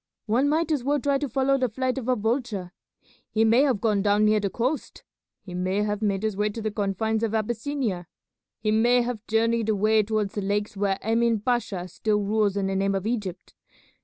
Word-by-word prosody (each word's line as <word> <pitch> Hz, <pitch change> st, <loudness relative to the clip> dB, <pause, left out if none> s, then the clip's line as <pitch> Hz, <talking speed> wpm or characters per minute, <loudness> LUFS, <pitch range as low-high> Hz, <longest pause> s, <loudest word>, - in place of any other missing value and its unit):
One 245 Hz, +6 st, +2 dB
might 320 Hz, +2 st, +1 dB
as 290 Hz, -5 st, 0 dB
well 290 Hz, +2 st, +1 dB
try 280 Hz, +1 st, +1 dB
to 290 Hz, -1 st, -3 dB
follow 270 Hz, +3 st, +2 dB
the 255 Hz, -1 st, +1 dB
flight 260 Hz, +3 st, -1 dB
of 245 Hz, -, -7 dB
a 255 Hz, -, +3 dB
vulture. 220 Hz, -5 st, -2 dB, 0.6 s
He 220 Hz, 0 st, +2 dB
may 230 Hz, +4 st, +5 dB
have 265 Hz, -7 st, +2 dB
gone 210 Hz, -2 st, +1 dB
down 205 Hz, +1 st, +3 dB
near 215 Hz, 0 st, +4 dB
the 200 Hz, -1 st, -1 dB
coast; 255 Hz, +9 st, -3 dB, 0.4 s
he 180 Hz, -, -9 dB
may 185 Hz, +3 st, 0 dB
have 210 Hz, 0 st, -2 dB
made 200 Hz, -2 st, 0 dB
his 215 Hz, -2 st, -1 dB
way 210 Hz, +1 st, +1 dB
to 210 Hz, -, -6 dB
the 215 Hz, -1 st, -2 dB
confines 215 Hz, +1 st, -1 dB
of 225 Hz, -1 st, -1 dB
Abyssinia; 225 Hz, -, -2 dB, 0.5 s
he 215 Hz, 0 st, -1 dB
may 240 Hz, +3 st, +4 dB
have 235 Hz, -3 st, -5 dB
journeyed 225 Hz, 0 st, +1 dB
away 215 Hz, +1 st, +3 dB
towards 210 Hz, -1 st, -1 dB
the 205 Hz, -, -2 dB
lakes 205 Hz, +2 st, -1 dB
where 195 Hz, -1 st, 0 dB
Emin 230 Hz, 0 st, +2 dB
Pasha 210 Hz, -6 st, -1 dB
still 210 Hz, +4 st, -1 dB
rules 205 Hz, -1 st, +1 dB
in 195 Hz, -, 0 dB
the 195 Hz, 0 st, -1 dB
name 195 Hz, +1 st, +1 dB
of 195 Hz, 0 st, -2 dB
Egypt. 205 Hz, -6 st, -4 dB
220 Hz, 210 wpm, -25 LUFS, 205-240 Hz, 0.6 s, may